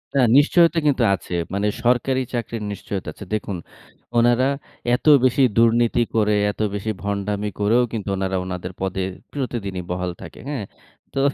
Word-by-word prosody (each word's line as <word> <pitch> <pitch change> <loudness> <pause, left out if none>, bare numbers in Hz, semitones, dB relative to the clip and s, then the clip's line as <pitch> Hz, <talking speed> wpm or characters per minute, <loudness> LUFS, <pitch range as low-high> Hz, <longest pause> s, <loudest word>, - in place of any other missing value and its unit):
না 135 - +4 0.2
নিশ্চয়তা 170 +3 +5
কিন্তু 130 -4 +3
আছে। 90 - -9 0.2
মানে 100 +1 0 0.2
সরকারি 125 +2 +2
চাকরির 115 -2 -3
নিশ্চয়তা 100 -1 -5
আছে। - - -10
দেখুন, 100 -3 -2 0.6
উনারা 120 +2 +4 0.5
এত 135 - -7 0.2
বেশি 130 +2 +3 0.2
দুর্নীতি 115 +1 +4
করে 105 -1 +3 0.2
এত 105 - -7
বেশি 110 +2 -2
ভন্ডামি 100 +1 -2
করেও 115 +4 +3
কিন্তু 105 -3 -3
উনারা 95 0 -1
উনাদের 90 0 -5
পদে 95 0 -1 0.3
প্রতিদিনই 105 -9 -4
বহাল 90 0 -2
থাকে। - - -10
হ্যাঁ, 125 -9 -3 0.5
তো 135 - -1
110 Hz, 150 wpm, -22 LUFS, 100-125 Hz, 0.6 s, নিশ্চয়তা